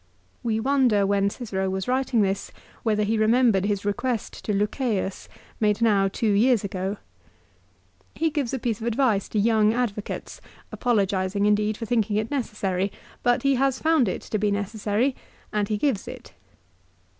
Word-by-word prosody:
3 230 -3 -1
We - - 0
wonder 250 -5 +3
when 200 0 +2
Cicero 195 -4 -3
was 190 0 -3
writing 255 -3 +2
this 195 0 -2 0.3
whether 210 -2 +1
he 220 +1 0
remembered 220 -3 +3
his 205 -1 -1
request 240 +2 -2
to - - -1
Lucceius 205 -1 -1 0.3
made 210 -1 +2
now 205 -4 +3
two 210 +2 0
years 225 +2 +3
ago. 195 +1 -3 1.2
He 325 0 0
gives 290 -6 -1
a 265 - -1
piece 230 -3 -2
of 230 - -3
advice 230 -4 +1
to - - -3
young 220 0 +3
advocates, 215 -4 -3 0.3
apologising 200 -4 0
indeed 210 0 +2
for 230 - -5
thinking 220 -2 0
it 215 +4 -1
necessary; 205 -7 -1 0.3
but 245 +2 +2
he 275 0 +3
has 270 -1 +2
found 315 -7 +3
it 185 - -2
to 215 - -2
be 210 0 +1
necessary, 210 +5 -1 0.4
and 210 -1 0
he 210 - 0
gives 230 -4 0
it. - - -10
215 Hz, 165 wpm, -25 LUFS, 200-245 Hz, 1.2 s, wonder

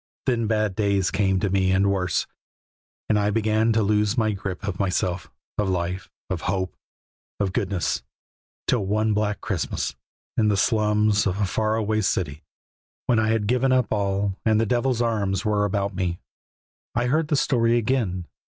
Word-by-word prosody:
Then 115 -4 +1
bad 105 -3 0
days 100 -3 +1
came 95 -1 +2
to 100 - 0
me 95 -1 +2
and 100 +1 +3
worse, 90 -3 0 0.8
and 105 - +3
I 105 0 +2
began 110 +1 +2
to 110 -1 +2
lose 105 +3 +1
my 110 -2 +2
grip 100 -1 -5
of 100 -2 -3
myself, 90 -2 -1 0.3
of 105 -2 +1
life, 90 0 -2 0.2
of - - -3
hope, 95 -1 -1 0.6
of 100 -2 0
goodness, 100 -6 -1 0.6
till 120 -5 +1
one 110 +2 +1
black 105 0 -1
Christmas, 95 -6 -2 0.4
in 110 - +3
the 105 -2 +2
slums 105 -1 +2
of 95 +1 -1
a 105 - +2
far 110 +3 0
away 110 -1 0
city, 80 -7 -1 0.6
when 120 -2 +3
I 110 - +2
had 110 -2 +1
given 125 +4 +2
up 125 -4 +2
all 100 -1 0
and 110 -1 +3
the 115 - +2
devil's 120 +1 +1
arms 100 -5 0
were 105 -1 +2
about 100 0 -1
me, 90 -2 -2 0.8
I 120 +1 +1
heard 155 +5 +1
the 150 - +1
story 120 -4 +2
again. 110 -7 0
105 Hz, 170 wpm, -24 LUFS, 95-110 Hz, 0.8 s, and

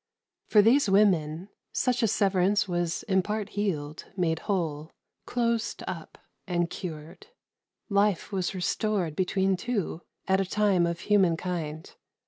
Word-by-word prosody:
For 210 -2 +6
these 235 +1 +4
women, 185 -3 +2 0.2
such 250 -2 +1
a 225 - +3
severance 200 0 +2
was 175 -2 -1
in 190 -3 +2
part 210 +1 -3
healed, 160 -8 -3
made 165 -3 +1
whole, 160 -6 -2 0.4
closed 235 -2 -1
up, 170 -4 -6 0.3
and 175 -1 0
cured. 165 -1 -7 0.6
Life 200 -2 +1
was 190 -1 -2
restored 185 -2 -1
between 190 +1 +1
two 200 -5 -3 0.3
at 190 0 +3
a - - -1
time 200 -5 +3
of 170 0 -3
human 190 -5 +3
kind. 160 -4 -4
190 Hz, 130 wpm, -27 LUFS, 170-210 Hz, 0.6 s, For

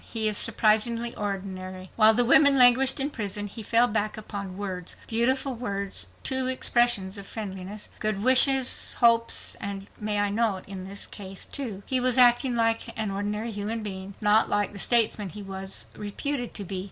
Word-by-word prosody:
He 220 -2 -1
is 210 - +3
surprisingly 225 +2 +1
ordinary. 190 -2 -6
While 220 0 +5
the 245 +1 +3
women 280 +2 +5
languished 260 +3 +6
in 280 +2 -2
prison, 205 -3 -4
he 205 +3 -7
fell 230 +3 +3
back 215 -2 -2
upon 200 -3 -7
words—beautiful 225 +7 -2
words, 200 -5 -4 0.2
too—expressions 240 -6 +2
of 195 - -10
friendliness, 200 -1 -7
good 215 -2 -2
wishes, 260 +1 +4
hopes, 230 -1 +2
and 200 -1 -6
may 210 -1 -1
I 205 0 0
nots. 210 -3 -1
In 190 -1 -8
this, 200 +1 -6 0.4
too, 220 -8 -5
he 260 - +1
was 250 0 +3
acting 245 0 +5
like 225 -1 +1
an 215 -2 -2
ordinary 210 +3 -4
human 215 +2 -4
being, 190 -1 -7
not 210 +1 +3
like 205 0 -1
the 200 - -7
statesman 220 -4 +2
he 205 +3 -9
was 195 0 -6
reputed 245 +5 -5
to 205 - -2
be. 190 0 -4
215 Hz, 165 wpm, -25 LUFS, 200-240 Hz, 0.4 s, languished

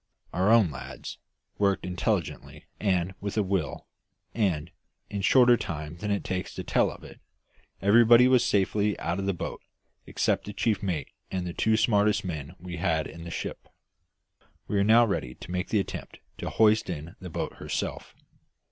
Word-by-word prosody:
Our 95 +3 +2
own 110 -7 +5
lads 70 -1 -8 0.4
worked 100 -2 +2
intelligently 90 -1 -2
and 95 -3 +1
with 100 +1 -4
a 105 - +3
will, 95 -7 -2 0.5
and, 85 -7 0 0.4
in 100 - -2
a - - -2
shorter 120 +4 +6
time 75 -2 -5
than 105 +4 -4
it 100 -1 0
takes 95 0 -4
to - - -4
tell - - +2
of - - -11
it, - - -12 0.6
everybody 120 +4 +7
was 130 -2 +5
safely 105 +1 +1
out 85 +3 -2
of 100 - -2
the 100 - +1
boat - - -5 0.5
except - - 0
the 105 - -6
chief 105 0 0
mate 85 -8 -2 0.2
and 90 -1 -3
the 85 - -4
two 110 +4 +2
smartest 105 -2 +2
men 80 -2 -5
we 90 -1 -7
had 80 -3 0
in 85 0 -9
the - - -6
ship. - - -5 1.0
We 105 - -1
were 100 - +4
now 115 +3 +6
ready 65 - -3
to - - -10
make 90 +1 -2
the 110 - +2
attempt 95 - -5 0.2
to - - -3
hoist 110 -2 +3
in 85 +1 -6
the 90 - -8
boat - - -4
herself. - - -4
95 Hz, 180 wpm, -27 LUFS, 85-105 Hz, 1.0 s, everybody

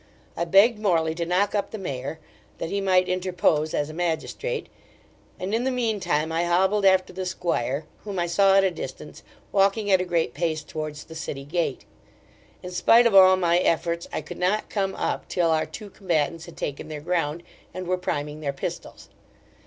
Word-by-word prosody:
I 170 - -1
begged 205 +6 +5
Morley 165 -6 +1
to 170 0 -3
knock 190 +3 +1
up 205 -1 -1
the 220 - -6
mayor, 140 -5 -5 0.4
that 165 - -4
he 200 - -1
might 185 -1 +3
interpose 180 -4 +1
as 145 - 0
a 155 - -8
magistrate, 175 - -2 0.7
and 190 +3 -3
in 230 +2 +1
the 265 - +1
mean 235 -5 0
time 160 -3 0
I 165 +1 +1
hobbled 190 +4 +2
after 190 -1 +4
the 190 +1 -4
squire, 155 -6 -2 0.2
whom 205 -2 -5
I 175 - +1
saw 195 +3 +4
at 195 - +5
a 190 - +2
distance - - -8 0.3
walking 200 +1 +2
at 190 -1 +5
a - - 0
great 170 -8 0
pace 160 -3 -1
towards 155 -1 -6
the 160 - -12
city 145 -3 -6
gate 160 -2 -2 0.8
in 180 - -6
spite 230 +7 +5
of 235 - +3
all 185 -1 +8
my 175 -1 +3
efforts, 170 0 0
I - - -2
could - - -9
not 190 +4 0
come 195 -2 -1
up - - -2
till 170 -2 +1
our 155 -1 +1
two 200 +6 -9
combatants 165 -4 -1
had 170 - -12
taken 140 +1 -4
their 155 -1 -6
ground, 170 -1 -1 0.3
and 185 - -6
were 185 +1 +1
priming 150 -4 -3
their 140 -2 -2
pistols. 135 - -6
175 Hz, 195 wpm, -25 LUFS, 160-195 Hz, 0.8 s, all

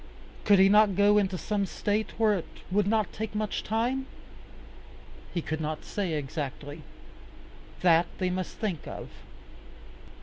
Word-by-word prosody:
Could 205 -1 +6
he 190 +1 +7
not 210 -1 +5
go 205 +1 +5
into 190 -2 0
some 200 +1 -1
State 210 +4 -1
where 220 -1 +4
it 185 -5 -3 0.2
would 200 +1 +2
not 215 -2 +1
take 220 -1 -5
much 215 -1 -2
time? 245 +5 -1 1.2
He 170 - -2
could 160 0 -3
not 155 0 -4
say 195 -6 -2
exactly. 145 0 -4 1.0
That 170 -1 +5
they 185 -1 0
must 185 0 -4
think 195 -9 -3
of. - - -7
200 Hz, 140 wpm, -28 LUFS, 170-210 Hz, 1.2 s, he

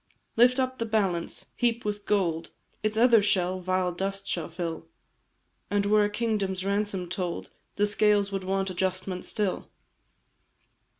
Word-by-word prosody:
"Lift 250 +3 +5
up 260 0 -1
the 230 - 0
balance 195 -6 -1
heap 235 -2 0
with 205 -1 -3
gold, 170 -6 +1 0.3
Its 215 0 -1
other 235 -1 +6
shell 185 -2 +1
vile 185 0 0
dust 195 +2 -3
shall 170 -2 -2
fill; 165 - -5 0.8
And 205 0 +1
were 210 +1 +4
a - - 0
kingdom's 205 -4 -1
ransom 200 -2 0
told, 180 -1 -4 0.2
The 205 - +3
scales 205 -1 +2
would 195 -1 -3
want 195 0 -1
adjustment 185 0 -2
still. 205 -3 -2
195 Hz, 140 wpm, -27 LUFS, 185-210 Hz, 0.8 s, other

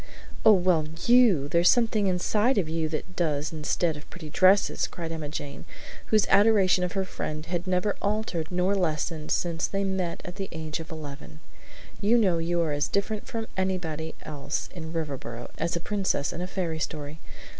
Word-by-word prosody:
"Oh, 220 - +8
well, 180 -5 +3 0.2
YOU! 235 - +5
There's 170 +3 +4
something 225 -4 +3
inside 210 +7 +2
of 185 -5 +2
you 160 0 -1
that 160 +3 -5
does 150 -3 -1
instead 160 +1 0
of 150 - -11
pretty 160 -4 -9
dresses," 190 +4 +4
cried 165 -2 -6
Emma 155 -2 -4
Jane, 145 -1 -6 0.4
whose 215 -2 +3
adoration 195 -2 +5
of 180 - -2
her 195 -1 0
friend 155 -4 -5
had 175 +1 -3
never 185 +2 +1
altered 205 -6 -1
nor 180 +2 +1
lessened 160 -4 -1
since 170 -1 0
they 195 0 -1
met 190 -3 -1
at 180 +2 -7
the 195 -1 -4
age 160 -1 -4
of 160 - -8
eleven. 155 -1 -8 0.6
"You 215 +4 +4
know 185 -7 +3
you 170 +1 0
are 160 -2 0
as 145 0 0
different 205 +1 -2
from 225 -1 -3
anybody 170 -4 -2
else 145 0 -4
in 160 -3 -7
Riverboro 135 -7 -5
as 165 +2 0
a - - -1
princess 190 -6 -1
in 170 - -5
a 180 - -2
fairy 170 -4 -2
story. 150 0 -4
175 Hz, 180 wpm, -27 LUFS, 155-195 Hz, 0.6 s, Oh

